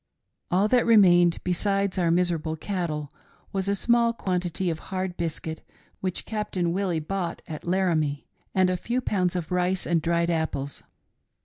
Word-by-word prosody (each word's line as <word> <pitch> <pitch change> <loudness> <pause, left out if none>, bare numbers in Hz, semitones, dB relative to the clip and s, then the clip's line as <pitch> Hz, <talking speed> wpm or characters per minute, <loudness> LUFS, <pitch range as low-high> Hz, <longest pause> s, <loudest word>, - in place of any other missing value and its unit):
All 190 +4 +3
that 250 0 +4
remained, 175 -6 +6
besides 195 +1 0
our 170 -2 +2
miserable 165 -2 +1
cattle, 155 -4 -3 0.4
was 195 0 -1
a 200 - +2
small 235 +2 +3
quantity 180 -3 -1
of 160 - -4
hard 185 -1 -2
biscuit 160 -1 -4 0.4
which 185 -2 -3
Captain 185 -6 -1
Willie 185 -3 0
bought 175 +2 -3
at 155 +1 -7
Laramie, 165 -6 +1 0.3
and 185 -1 +4
a 180 - 0
few 240 +7 -1
pounds 185 -7 0
of 175 -2 -3
rice 180 +1 +1
and 170 -1 +1
dried 170 +1 +1
apples. 145 -4 -2
180 Hz, 150 wpm, -26 LUFS, 165-195 Hz, 0.4 s, remained